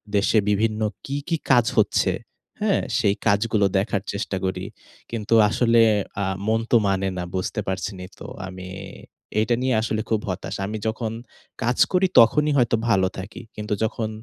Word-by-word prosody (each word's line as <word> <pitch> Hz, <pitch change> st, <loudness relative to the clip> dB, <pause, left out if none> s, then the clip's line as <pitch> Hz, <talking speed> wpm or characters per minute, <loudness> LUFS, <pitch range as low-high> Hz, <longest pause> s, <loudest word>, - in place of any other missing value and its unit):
দেশে 100 Hz, +2 st, +3 dB
বিভিন্ন 110 Hz, +1 st, +1 dB, 0.2 s
কী, 140 Hz, -, -4 dB
কী 165 Hz, -, +1 dB
কাজ 120 Hz, -3 st, +5 dB
হচ্ছে, -, -, +3 dB, 0.5 s
হ্যাঁ? 210 Hz, -2 st, +2 dB, 0.2 s
সেই 105 Hz, -5 st, +2 dB
কাজগুলো 105 Hz, 0 st, +2 dB
দেখার 100 Hz, 0 st, 0 dB
চেষ্টা 100 Hz, -1 st, -3 dB
করি। 95 Hz, 0 st, -2 dB, 0.5 s
কিন্তু 115 Hz, -1 st, -2 dB, 0.2 s
আসলে 115 Hz, +1 st, +3 dB, 0.4 s
আ -, -, 0 dB, 0.2 s
মন 110 Hz, +1 st, +3 dB
তো 120 Hz, -, +7 dB
মানে 95 Hz, 0 st, +1 dB
না 90 Hz, -, -2 dB
বুঝতে 95 Hz, -, -2 dB
পারছেন 95 Hz, +1 st, -3 dB
ই -, -, -10 dB
তো? -, -, -8 dB, 0.2 s
আমি 95 Hz, -1 st, -8 dB, 0.7 s
এটা 115 Hz, +2 st, +2 dB
নিয়ে 130 Hz, 0 st, +1 dB
আসলে 110 Hz, -1 st, -1 dB
খুব 110 Hz, -, +2 dB
হতাশ। 95 Hz, +1 st, -4 dB
আমি 110 Hz, +2 st, -4 dB
যখন 110 Hz, 0 st, -2 dB, 0.5 s
কাজ 120 Hz, +2 st, +1 dB
করি 185 Hz, 0 st, +3 dB
তখনই 150 Hz, +6 st, +5 dB
হয়তো 120 Hz, -2 st, +3 dB
ভালো 95 Hz, -4 st, +3 dB
থাকি। 95 Hz, +3 st, -7 dB
কিন্তু 105 Hz, 0 st, -3 dB
যখন 110 Hz, 0 st, -1 dB
110 Hz, 165 wpm, -23 LUFS, 100-115 Hz, 0.7 s, তো